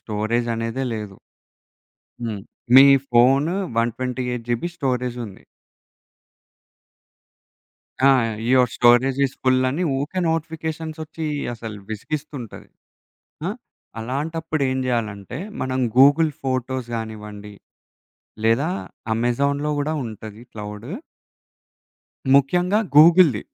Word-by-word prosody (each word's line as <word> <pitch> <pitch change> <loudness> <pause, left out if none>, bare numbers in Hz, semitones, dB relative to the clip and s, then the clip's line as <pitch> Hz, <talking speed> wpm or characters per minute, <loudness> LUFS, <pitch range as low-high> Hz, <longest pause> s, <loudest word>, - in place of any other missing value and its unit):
స్టోరేజనేదే 115 +3 -2
లేదు. 105 -3 -6 1.1
హ్మ్. 110 -4 -4 0.3
మీ 135 - +11 0.3
phone 135 +7 +4 0.2
128 125 +1 -2
GB 120 +8 0
స్టోరేజుంది. 125 - -3 2.6
ఆ! - - +7 0.4
యువర్ 125 -1 +4
స్టోరేజ్ 125 +2 +4
ఇస్ 135 - -5
ఫుల్లని 130 +5 +2
ఉకే 145 +7 -2
నోటిఫికేషన్స్‌సోచ్చి 160 0 -4 0.3
అసలు 110 -2 -7
విసిగిస్తుంటది. 135 +1 -6 0.8
ఆ! - - -1 0.5
అలాంటప్పుడు 155 +5 -3
ఏం 130 - -1
జేయాలంటే 115 -1 -3 0.2
మనం 130 0 -2 0.2
గూగుల్ 145 +4 +6
ఫోటోస్ 130 -1 -2
గానివ్వండి, 105 -2 -7 0.9
లేదా 120 +9 +2 0.4
అమెజాన్‌లో 140 +6 0
కూడా 150 +2 -1
ఉంటది 110 -1 -9
క్లౌడు. 105 +3 -8 1.5
ముఖ్యంగా 180 +9 +3 0.2
గూగుల్‌ది. 160 - +7
130 Hz, 80 wpm, -22 LUFS, 115-145 Hz, 2.6 s, మీ